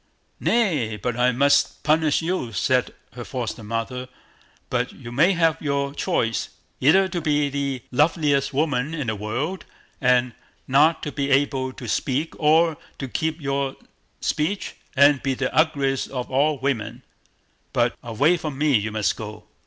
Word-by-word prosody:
"Nay! 150 Hz, -, +1 dB
but 120 Hz, +4 st, -2 dB
I 125 Hz, +1 st, +3 dB
must 140 Hz, +3 st, +2 dB
punish 155 Hz, 0 st, +2 dB
you!" 165 Hz, -9 st, -2 dB
said 125 Hz, +6 st, +1 dB, 0.2 s
her 120 Hz, +1 st, -7 dB
foster 120 Hz, -3 st, -5 dB
mother; 115 Hz, +4 st, -4 dB, 0.6 s
"but 125 Hz, 0 st, 0 dB
you 120 Hz, -3 st, -10 dB
may 160 Hz, +10 st, +4 dB
have 165 Hz, -2 st, +2 dB
your 140 Hz, -1 st, -1 dB
choice, 115 Hz, -5 st, -1 dB, 0.3 s
either 190 Hz, +8 st, +5 dB
to 175 Hz, -2 st, -3 dB
be 150 Hz, -2 st, +1 dB
the 140 Hz, -3 st, -3 dB
loveliest 145 Hz, 0 st, +2 dB
woman 145 Hz, 0 st, 0 dB
in 150 Hz, -4 st, -3 dB
the 110 Hz, -1 st, -1 dB
world, 120 Hz, -, -3 dB, 0.4 s
and 125 Hz, -2 st, +3 dB, 0.3 s
not 150 Hz, +5 st, +4 dB
to 150 Hz, -, -3 dB
be 140 Hz, -1 st, -2 dB
able 135 Hz, -1 st, +1 dB
to 125 Hz, -, -9 dB
speak, 140 Hz, +8 st, -1 dB
or 160 Hz, +1 st, +4 dB, 0.2 s
to 135 Hz, -, -5 dB
keep 160 Hz, +5 st, -2 dB
your 140 Hz, -2 st, -2 dB, 0.5 s
speech, 170 Hz, +7 st, -1 dB, 0.2 s
and 140 Hz, 0 st, +5 dB
be 135 Hz, -1 st, -1 dB
the 130 Hz, 0 st, -2 dB
ugliest 140 Hz, -4 st, +1 dB
of 125 Hz, -2 st, -5 dB
all 145 Hz, +3 st, +2 dB
women; 130 Hz, -4 st, -3 dB, 0.7 s
but -, -, +1 dB
away 140 Hz, +10 st, +2 dB
from 155 Hz, -4 st, -5 dB
me 150 Hz, -1 st, +3 dB
you 110 Hz, 0 st, 0 dB
must 105 Hz, -1 st, 0 dB
go." 105 Hz, -1 st, -8 dB
140 Hz, 155 wpm, -23 LUFS, 125-155 Hz, 0.7 s, either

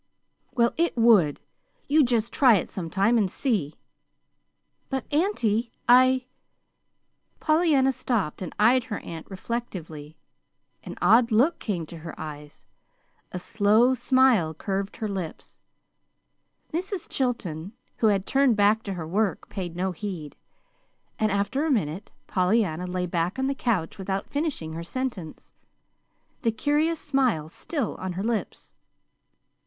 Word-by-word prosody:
"Well, 235 Hz, -1 st, +2 dB
it 335 Hz, -5 st, +1 dB
would. 215 Hz, -11 st, +5 dB, 0.5 s
You 300 Hz, +1 st, +5 dB
just 235 Hz, -2 st, 0 dB
try 255 Hz, -5 st, +6 dB
it 190 Hz, -, -2 dB
sometime, 195 Hz, +6 st, +1 dB
and 195 Hz, -4 st, 0 dB
see." 200 Hz, -, -1 dB, 1.1 s
"But, 265 Hz, -3 st, -2 dB
auntie, 245 Hz, -, +1 dB, 0.2 s
I 255 Hz, +1 st, +5 dB, 0.5 s
" -, -, -47 dB
Pollyanna 310 Hz, -4 st, +3 dB
stopped 225 Hz, -, -2 dB
and 180 Hz, -, -4 dB
eyed 235 Hz, +3 st, +4 dB
her 215 Hz, -5 st, -4 dB
aunt 160 Hz, -1 st, -8 dB
reflectively. 175 Hz, -8 st, -6 dB, 0.7 s
An 180 Hz, -, -8 dB
odd 230 Hz, +2 st, +5 dB
look 255 Hz, +10 st, +3 dB
came 180 Hz, -7 st, -3 dB
to 165 Hz, -, -10 dB
her 165 Hz, +1 st, -9 dB
eyes; 150 Hz, -1 st, -9 dB, 0.7 s
a -, -, -4 dB
slow 220 Hz, +5 st, +3 dB
smile 255 Hz, -11 st, +3 dB
curved 195 Hz, +3 st, -3 dB
her 220 Hz, -, -3 dB
lips. 190 Hz, -5 st, -6 dB, 1.1 s
Mrs. 370 Hz, +2 st, -3 dB
Chilton, 200 Hz, -, -3 dB, 0.2 s
who 225 Hz, -, +3 dB
had 200 Hz, -2 st, +2 dB
turned 270 Hz, -3 st, +3 dB
back 210 Hz, +2 st, +3 dB
to 200 Hz, -3 st, -5 dB
her 165 Hz, -4 st, -5 dB
work, 200 Hz, +3 st, -1 dB
paid 180 Hz, -4 st, -5 dB
no 185 Hz, +2 st, -1 dB
heed; 175 Hz, -5 st, -6 dB, 0.8 s
and, 215 Hz, -1 st, +2 dB
after 200 Hz, +8 st, 0 dB
a 320 Hz, -, 0 dB
minute, 195 Hz, -, -1 dB, 0.2 s
Pollyanna 180 Hz, -2 st, +1 dB
lay 180 Hz, 0 st, -2 dB
back 175 Hz, +4 st, -1 dB
on 265 Hz, -, 0 dB
the 275 Hz, -, +1 dB
couch 215 Hz, -11 st, -1 dB
without 195 Hz, +1 st, -3 dB
finishing 285 Hz, -, -2 dB
her 165 Hz, +1 st, -5 dB
sentence, 205 Hz, -6 st, -5 dB, 0.9 s
the 230 Hz, -5 st, +2 dB
curious 300 Hz, +7 st, +1 dB
smile 255 Hz, -, 0 dB
still 275 Hz, -, -3 dB
on 185 Hz, -1 st, -4 dB
her 190 Hz, +3 st, -4 dB
lips. 225 Hz, -1 st, -3 dB
215 Hz, 135 wpm, -26 LUFS, 180-255 Hz, 1.1 s, try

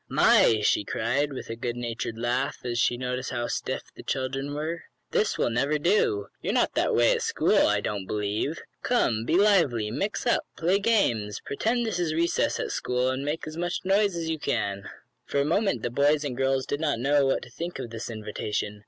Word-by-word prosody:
"My!" 110 Hz, -2 st, +5 dB
she 105 Hz, -, +3 dB
cried, 130 Hz, +8 st, -1 dB
with 130 Hz, -, -6 dB
a -, -, -3 dB
goodnatured 115 Hz, -1 st, -4 dB
laugh, 125 Hz, +3 st, -2 dB
as 120 Hz, -1 st, -1 dB
she 120 Hz, -, +2 dB
noticed 125 Hz, 0 st, -3 dB
how 120 Hz, -1 st, -2 dB
"stiff" -, -, -3 dB
the -, -, -9 dB
children 135 Hz, +1 st, -3 dB
were. 160 Hz, +3 st, -4 dB, 0.3 s
"This 215 Hz, -, +1 dB
will -, -, +1 dB
never 140 Hz, +6 st, +1 dB
do. 215 Hz, -, +2 dB, 0.2 s
You're -, -, -1 dB
not -, -, +2 dB
that -, -, +1 dB
way -, -, +5 dB
at 485 Hz, -2 st, +1 dB
school, 455 Hz, -, +3 dB
I 105 Hz, -1 st, +2 dB
don't 100 Hz, -3 st, -3 dB
believe. 105 Hz, +9 st, -2 dB, 0.2 s
Come, 115 Hz, -, +1 dB
be 160 Hz, -, +1 dB
lively. 165 Hz, -, +3 dB
Mix 200 Hz, -, -2 dB
up 240 Hz, -, +3 dB, 0.2 s
play 180 Hz, +4 st, +2 dB
games. 120 Hz, -, +1 dB
Pretend 230 Hz, -, 0 dB
this 215 Hz, -6 st, -2 dB
is 160 Hz, -3 st, 0 dB
recess 170 Hz, +1 st, +1 dB
at -, -, -2 dB
school, 125 Hz, +1 st, 0 dB
and 130 Hz, +1 st, -3 dB
make 150 Hz, +3 st, -3 dB
as 155 Hz, +1 st, -7 dB
much 175 Hz, +1 st, -2 dB
noise 200 Hz, 0 st, +3 dB
as 165 Hz, -1 st, -3 dB
you 160 Hz, -1 st, -2 dB
like." 100 Hz, -3 st, -1 dB, 0.4 s
For 140 Hz, -, 0 dB
a 140 Hz, -, +2 dB
moment 175 Hz, -, +1 dB
the 120 Hz, -, -1 dB
boys 145 Hz, +4 st, +3 dB
and 140 Hz, -4 st, -3 dB
girls 135 Hz, 0 st, +1 dB
did 145 Hz, -, -2 dB
not 150 Hz, -5 st, 0 dB
know 140 Hz, +3 st, +3 dB
what 135 Hz, -, 0 dB
to 125 Hz, -, -12 dB
think 170 Hz, +7 st, -5 dB
of 125 Hz, -3 st, -6 dB
this 115 Hz, +1 st, -6 dB
invitation. 105 Hz, -1 st, -4 dB
135 Hz, 205 wpm, -26 LUFS, 115-170 Hz, 0.4 s, My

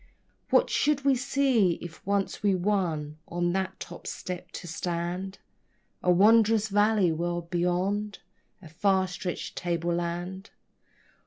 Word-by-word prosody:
What -, -, +4 dB
should 285 Hz, -2 st, +1 dB
we 275 Hz, -, +5 dB
see, 255 Hz, -7 st, +2 dB
if 170 Hz, -2 st, -10 dB
once 200 Hz, -1 st, 0 dB
we 200 Hz, -2 st, +3 dB
won 170 Hz, -6 st, -1 dB
on 175 Hz, 0 st, -1 dB
that 190 Hz, 0 st, -2 dB
top -, -, -9 dB
step 180 Hz, -1 st, -6 dB
to -, -, -7 dB
stand? 175 Hz, +3 st, -3 dB, 0.6 s
A 180 Hz, -, 0 dB
wondrous 215 Hz, +3 st, +5 dB
valley 205 Hz, -3 st, +3 dB
world 170 Hz, +1 st, -3 dB
beyond? 185 Hz, +4 st, 0 dB, 0.5 s
A -, -, -10 dB
far 190 Hz, +3 st, +2 dB
stretched 180 Hz, 0 st, -5 dB
tableland? 175 Hz, +2 st, -2 dB
185 Hz, 120 wpm, -28 LUFS, 175-205 Hz, 0.6 s, we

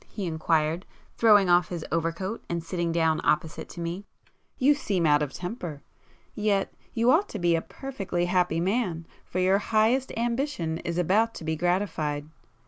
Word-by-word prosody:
he 200 Hz, -, -5 dB
inquired, 160 Hz, 0 st, 0 dB, 0.3 s
throwing 210 Hz, -4 st, +6 dB
off 175 Hz, 0 st, +4 dB
his 170 Hz, -3 st, -5 dB
overcoat 165 Hz, +6 st, -2 dB
and 170 Hz, -1 st, -2 dB
sitting 170 Hz, 0 st, -2 dB
down 160 Hz, -1 st, +2 dB
opposite 155 Hz, +1 st, 0 dB
to -, -, -9 dB
me—"You 200 Hz, +10 st, -2 dB
seem 200 Hz, -, -1 dB
out 150 Hz, -1 st, +4 dB
of 145 Hz, -2 st, -1 dB
temper! 175 Hz, -, -6 dB, 0.5 s
Yet 205 Hz, -2 st, 0 dB, 0.2 s
you 235 Hz, +2 st, +4 dB
ought 345 Hz, +8 st, +3 dB
to -, -, -5 dB
be 175 Hz, -3 st, +2 dB
a 165 Hz, -, 0 dB
perfectly 195 Hz, -10 st, -4 dB
happy 180 Hz, -2 st, +1 dB
man—for 180 Hz, -3 st, -3 dB
your 185 Hz, +2 st, +3 dB
highest 225 Hz, +5 st, +2 dB
ambition 235 Hz, -, -1 dB
is 170 Hz, 0 st, -4 dB
about 210 Hz, +6 st, +2 dB
to -, -, -8 dB
be 160 Hz, 0 st, -1 dB
gratified. 160 Hz, -4 st, -1 dB
180 Hz, 155 wpm, -27 LUFS, 165-210 Hz, 0.5 s, throwing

